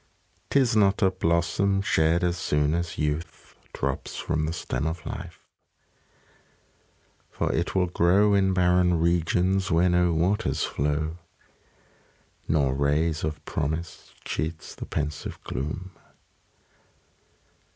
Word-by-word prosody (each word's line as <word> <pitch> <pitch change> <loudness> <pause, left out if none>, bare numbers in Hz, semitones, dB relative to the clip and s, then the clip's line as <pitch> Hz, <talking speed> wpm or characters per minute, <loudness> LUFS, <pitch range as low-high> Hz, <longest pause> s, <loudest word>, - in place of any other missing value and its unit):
'Tis 130 -5 +3
not 100 0 +3
a 95 - +4
blossom, 85 +3 +1
shed 85 -3 +2
as 90 -1 +1
soon 75 -3 +1
as 85 0 -2
youth 75 +2 -3 0.2
Drops 70 0 -3
from 75 0 -1
the - - -1
stem 75 -4 -3
of 80 +2 -4
lifeâ - - -6 2.0
for - - -2
it 85 +4 -1
will 95 -1 +3
grow 90 +4 +3
In 95 -1 +3
barren 90 -1 +3
regions, 90 +3 +1
where 85 +3 +3
no 90 0 +3
waters 95 +7 0
flow. 75 +3 -1 1.3
Nor 70 -4 +2
ray 70 +4 +2
of 75 -1 -4
promise 80 +2 -4
cheats 80 +1 -4
the - - -8
pensive 75 0 -4
gloom. 75 +8 -4
85 Hz, 115 wpm, -26 LUFS, 75-90 Hz, 2.0 s, a